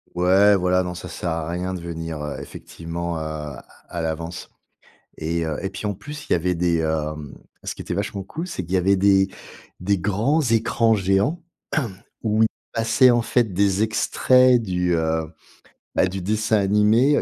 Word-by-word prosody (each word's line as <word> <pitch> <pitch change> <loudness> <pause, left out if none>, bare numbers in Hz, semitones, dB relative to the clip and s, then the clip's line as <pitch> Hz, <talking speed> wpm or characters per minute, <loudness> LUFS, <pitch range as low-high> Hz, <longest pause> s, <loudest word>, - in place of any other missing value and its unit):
Ouais, 95 +3 +5
voilà. 90 0 +2
Non, 90 0 -4
ça 90 - -8
sert 90 - -4
à 80 0 -2
rien 90 +2 -3
de 90 - -5
venir, 80 -2 -5
heu, 75 -1 -5
effectivement, 85 0 -6
heu, - - -4
à 75 -4 -6 0.2
à 85 - -4
l'avance. 80 +1 -4 0.7
Et, 85 +1 -1
heu, 80 -2 -3
et 95 - -1
puis, 95 - -8
en 105 - 0
plus, 145 +9 -9
il - - 0
y - - +6
avait 90 +2 0
des, 85 -1 +1
hem, 75 -2 -2 0.3
ce - - -4
qui - - -8
était - - -5
vachement 100 +1 -3
cool, 160 - -6
c'est 95 - -5
qu'il 85 - -8
y - - +5
avait 95 +2 +3
des 95 0 +4 0.5
des 100 +1 +1
grands 110 - +1
écrans 115 -2 +2
géants 100 - +1 0.8
où 110 0 +3
il 110 - +3 0.2
passait, 115 +3 +4
en 120 -1 +3
fait, 115 -3 +1
des 100 +1 +2
extraits 125 +3 +4
du, 90 -3 0
heu, 80 0 0 0.7
bah, - - +3
du 95 0 -4
dessin 110 +3 +1
animé, 105 +8 +4
heu, - - +2
95 Hz, 190 wpm, -23 LUFS, 85-110 Hz, 0.8 s, y